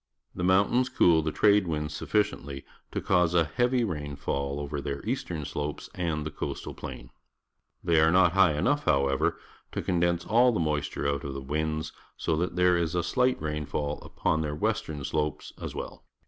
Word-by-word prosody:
The - - -6
jnountains. 100 +8 +3
cool 85 -9 +5
Jhe 80 0 -2
trade 105 0 +4
winds 75 -1 -2
suffi 105 +7 +2
ciently 70 -9 -6 0.3
to - - -2
cause 90 -2 +2
a 85 - +5
heavy 120 - +1
rainfall 70 -5 -3
over 70 0 -4
their 70 +3 -5
eastern 115 - -2
slopes 75 +1 -4
and 80 -4 -2
the 80 - -4
coastal - - -5
plain. - - -8 0.7
They 85 -2 +3
are^not 85 +3 +5
high 90 -5 +4
enough, 145 - +1
however, 70 -2 +2 0.4
to - - -2
condense 85 -1 +1
aU 120 +3 +5
the 105 - 0
moisture 75 -3 -1
out 70 0 -1
of 70 -1 -5
the - - -3
winds, 75 +2 -2 0.3
so 80 - 0
that 90 +2 -1
there 90 0 +4
is 85 0 -1
a 90 - +2
sUght 125 +7 +1
rainfa 75 -1 -4
ll 75 0 -1 0.2
__ux>oii. 80 - +1
their 75 -1 -2
western 80 -6 -2
sl 75 - -1
opes 75 0 -3
as - - -5
weU. - - -6
80 Hz, 185 wpm, -28 LUFS, 75-90 Hz, 0.7 s, cool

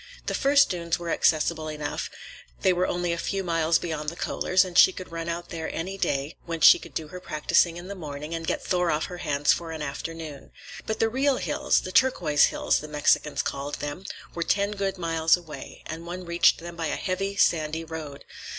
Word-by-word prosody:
The - - -2
first 280 -2 +4
dunes 170 -2 -1
were 170 -1 -4
accessible 155 0 +2
enough; 150 -1 -4 0.5
they 185 - +4
were 180 +1 +1
only 175 -1 -1
a 170 - -3
few 195 +2 -2
miles 165 -2 +2
beyond 155 -3 -3
the 170 - -9
Kohlers', 185 +2 +1
and 180 -1 -8
she 190 - +8
could 185 -2 -9
run 165 0 -4
out 170 +1 -4
there 165 -2 -4
any 185 +4 -4
day 140 -5 -1
when 165 -1 -3
she 150 - +8
could - - -13
do 155 -2 -3
her 180 - -8
practicing 165 +1 +1
in 175 +1 -8
the 200 - -5
morning 150 -3 -7
and 165 -1 -4
get - - -2
Thor 180 -2 +1
off 155 0 +1
her 180 -1 -8
hands 145 -2 +2
for 165 -1 -5
an 160 -2 -5
afternoon. 155 0 -6 0.4
But 220 - -1
the 225 - +3
real 265 +3 +1
hills—the 185 - 0
Turquoise 180 - +4
Hills, - - +1
the 155 - -8
Mexicans 150 0 +1
called 140 +1 -3
them—were 170 +3 -7
ten 200 +4 +1
good 195 -2 -2
miles 165 -1 +2
away, 165 -4 -10
and 165 +2 -7
one 180 +1 -6
reached 170 0 +4
them 170 0 -8
by 165 -1 -2
a - - -1
heavy, 195 +1 -2
sandy 160 -4 +2
road. 155 -3 -8
170 Hz, 205 wpm, -26 LUFS, 155-185 Hz, 0.5 s, she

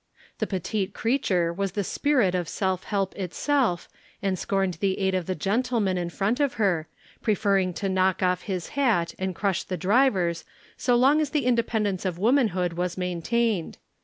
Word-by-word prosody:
The - - 0
petite 195 +1 -2
creature 190 -9 +1
was 195 0 -2
the 205 - -1
spirit 250 -3 +1
of 175 -3 -1
self 190 -2 -1
help 195 -2 -1
itself 200 - 0 0.3
and 190 -2 -1
scorned 195 -4 -1
the 195 -2 0
aid 190 -1 0
of 185 -3 -1
the 185 - -1
gentleman 210 +1 0
in 175 -1 -2
front 205 - -1
of 285 -3 +1
her, 180 -7 +1 0.3
preferring 200 -4 +2
to 200 - -2
knock 190 0 +1
off 180 0 +2
his 185 -4 -4
hat 230 - +1
and 190 -1 -2
crush 195 -2 0
the 185 - -4
driver's 185 -6 +2 0.3
so 245 -1 +1
long 275 +5 +4
as 300 - -1
the 290 -4 0
independence 220 -5 +1
of 185 -3 -2
womanhood 200 -6 +2
was 180 +1 -2
maintained. 185 +2 -1
195 Hz, 170 wpm, -26 LUFS, 180-230 Hz, 0.3 s, long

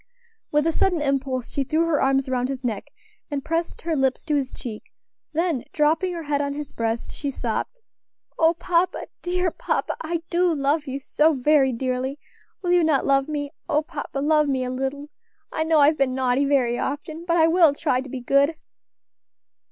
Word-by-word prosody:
With 295 0 +2
a 330 - +3
sudden 355 +1 +1
impulse 270 -3 -1
she 280 - 0
threw 315 +5 +1
her 325 -3 +1
arms 270 0 +2
round 255 -1 0
his 265 -1 -4
neck, 220 -5 -2 0.4
and 285 -1 -3
pressed 330 +1 -2
her 330 -1 0
lips 265 -2 0
to 305 - -1
his 275 -3 0
cheek; 220 -4 -7 0.5
then 325 -5 0
dropping 315 +5 +2
her 335 -1 -5
head 290 -1 0
on 280 0 -2
his 290 -1 -6
breast, 230 0 -2
she 285 - -4
sobbed: 255 - -3 0.6
"O 325 +1 +4
papa! 350 +1 0
dear 360 0 0
papa, - - -2
I 330 +1 -3
do 355 0 +3
love 290 +2 0
you 270 +1 -3
so 300 +3 +2
very 270 0 +3
dearly! 255 +2 -2 0.5
will 355 - +1
you 355 -1 +5
not 305 -4 +2
love 275 -1 +3
me? 290 -2 -3 0.2
O 300 +1 +2
papa! 300 -3 -6
love 300 +1 +3
me 265 -2 0
a 250 - -3
little. 270 +3 -4 0.4
I 315 - 0
know 320 0 +3
I've 300 +2 +4
been 260 -2 +2
naughty 260 +1 +2
very 250 -4 +2
often, 310 +3 -4
but 340 0 +1
I 320 - +6
will 325 -3 +5
try 270 -5 0
to 270 - -9
be 255 0 -5
good." 280 +5 +3
285 Hz, 190 wpm, -24 LUFS, 265-320 Hz, 0.6 s, I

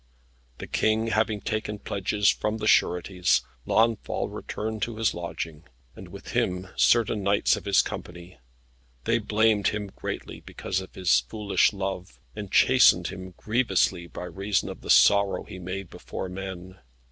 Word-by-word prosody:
The - - -7
King 110 +1 +1
having 110 -1 0
taken 105 0 -3
pledges 100 +1 -1
from 105 +1 +1
the 110 - -4
sureties, 90 - +2 0.2
Launfal 115 0 +1
returned 110 0 -5
to 115 +2 -2
his 110 -1 +1
lodging, 85 -2 -6 0.3
and - - -10
with - - -11
him 90 0 -1
certain 115 -3 +3
knights 100 +1 +2
of - - -8
his 100 -1 +4
company. 85 -2 -8 0.6
They 115 +7 +1
blamed 110 -1 +2
him 105 -2 -3
greatly - - -6
because 95 0 -4
of 95 - -12
his 85 -9 +3
foolish 100 - +1
love, 95 -2 -5 0.2
and 105 -2 -7
chastened 125 -9 +5
him 95 -1 -9
grievously 95 -6 +1
by 85 - -8
reason 95 +3 -2
of - - -8
the - - -10
sorrow 100 -2 +5
he 95 - -10
made 90 +1 -6
before 95 - -6
men. 95 0 -8
100 Hz, 150 wpm, -26 LUFS, 90-110 Hz, 0.6 s, chastened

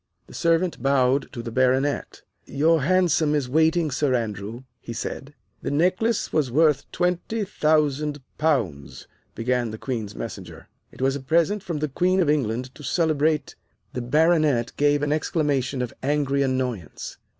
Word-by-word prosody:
The - - -15
servant 170 +1 +1
bowed 135 0 +2
to 120 - -6
the 115 - -5
Baronet. 130 +3 0 0.2
"Your 160 +3 +2
hansom 170 -2 +2
is 140 -4 0
waiting, 160 +3 +2
Sir 135 0 +1
Andrew," 110 +1 -4 0.2
he 115 - -7
said. 140 +5 -6 0.3
"The - - -3
necklace 185 +9 +1
was 150 -5 +1
worth 150 +2 +2
twenty 180 +5 -1
thousand 150 -4 +1 0.2
pounds," 80 - -1 0.3
began 120 +1 0
the 110 - -6
Queen's 110 -5 -4
Messenger. 95 -7 -8 0.2
"It - - -6
was 135 +1 +2
a - - -3
present 170 +9 +1
from 175 -5 -4
the 155 +1 -1
Queen 180 +7 +1
of 165 -5 +3
England 125 -2 -1
to - - -14
celebrate 155 +2 +1 0.2
" - - -44
The 125 - -3
Baronet 150 -2 +2
gave 145 0 +2
an 145 - 0
exclamation 145 -4 0
of 120 - -5
angry 140 0 +1
annoyance. 130 - -3
145 Hz, 155 wpm, -24 LUFS, 125-160 Hz, 0.3 s, of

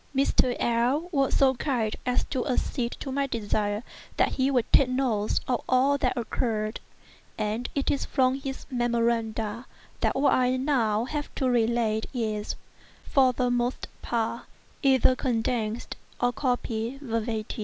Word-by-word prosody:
Mr. 260 -2 +3
L—l 245 +8 +1
was 275 -4 +2
so 270 -1 +5
kind 240 -4 -1
as 250 - +2
to 260 -3 -3
accede 250 -2 -1
to 270 - -6
my 280 +1 0
desire 210 -2 -1 0.3
that - - +4
he 265 0 +1
would 250 -4 +2
take 270 - +6
notes 245 -5 +1
of 250 -2 0
all 260 +2 +4
that 280 - 0
occurred, 220 -2 -1 0.6
and 215 +3 -2
it 280 - +1
is 280 - 0
from 260 -2 +2
his 270 0 -5
memoranda 235 -1 0 0.3
that - - +1
what 280 +2 +3
I 255 0 +2
now 240 -5 +1
have 295 +2 -4
to 265 - 0
relate 230 -2 +1
is, 215 -3 -2 0.5
for 265 -2 +4
the 250 0 0
most 245 +1 -1
part, 235 0 -2 0.4
either 260 -2 +4
condensed 230 -2 -1 0.2
or 245 0 +2
copied 245 0 -2
verbatim. 225 -4 -3
245 Hz, 145 wpm, -27 LUFS, 225-265 Hz, 0.6 s, take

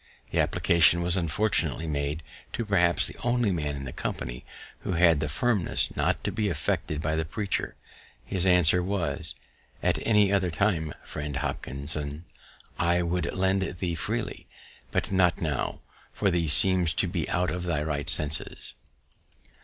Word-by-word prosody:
The - - 0
application 85 0 +4
was 85 +1 +1
unfortunately 90 0 +1
[made] 75 +1 -2 0.3
to 115 - -2
perhaps 90 -4 +3
the - - -5
only 120 -3 +2
man 75 -5 -2
in 70 - -6
the 60 - -6
company - - -5 0.4
who - - -3
had 85 -3 +4
the 75 0 -2
firmness 100 - 0
not - - 0
to - - -1
be 105 -2 -1
affected 75 -2 -2
by 80 +1 0
the 80 - 0
preacher. 100 +6 -2 0.5
His 95 -1 -1
answer 90 -1 +5
was, 95 -1 -2 0.5
"_At - - +1
any 105 -3 +4
other 95 -2 +2
time, 80 -2 0
Friend 75 -1 -5
Hopkinson, 70 +2 -4 0.5
I 85 +1 +2
would 85 +1 -1
lend 95 +1 +1
to 95 - -2
thee 90 -1 -3
freely; - - -4 0.4
but - - -1
not 90 -3 +3
now, 75 -5 -2 0.3
for 100 -2 0
thee 85 -2 0
seems 90 0 +6
to - - +1
be - - -3
out 90 +1 0
of 90 0 -4
thy 80 -4 0
right 75 -2 -2
senses. 75 0 -1
85 Hz, 160 wpm, -27 LUFS, 75-95 Hz, 0.5 s, seems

